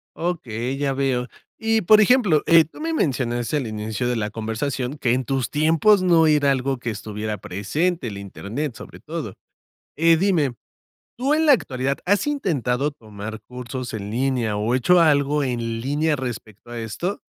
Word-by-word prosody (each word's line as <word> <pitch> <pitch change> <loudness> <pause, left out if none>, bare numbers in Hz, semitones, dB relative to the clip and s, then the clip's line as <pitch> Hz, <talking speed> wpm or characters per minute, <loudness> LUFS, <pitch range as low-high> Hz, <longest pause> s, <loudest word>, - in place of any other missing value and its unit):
Okey, 130 -7 -3
ya 140 -1 0
veo. 130 -2 0 0.3
Y, 225 0 +1
por 215 +3 +6
ejemplo, 210 - +4
eh, 165 -1 +7
tú 160 - -15
me 325 +1 -2
mencionaste, 125 - 0
al 135 -5 -2
inicio 110 +3 -3
de 125 - 0
la 105 -2 -2
conversación, 125 +5 -3
que 120 -4 +1
en 130 0 -1
tus 135 -1 -1
tiempos 165 +7 +4
no 170 -3 +4
era 150 -2 +4
algo 135 0 0
que 120 - -4
estuviera 105 0 -4
presente, 135 - -2
el 100 -3 -6
Internet, 110 +7 -5
sobre - - -11
todo, - - -6 0.6
eh, 165 +1 +4
dime, 160 -9 +1 0.6
¿tú, 265 +4 0
en 315 +1 +2
la 295 - +8
actualidad, 135 - 0
has 200 +4 +2
intentado 150 - 0
tomar 110 -4 -9
cursos 125 0 -7
en 105 -1 -5
línea 120 -3 0
o 110 +4 0
hecho 175 +8 +4
algo 145 -2 +3
en 115 -3 -2
línea 150 +4 0
respecto 120 -4 -7
a 120 - -5
esto? 170 - -4
135 Hz, 170 wpm, -22 LUFS, 115-160 Hz, 0.6 s, la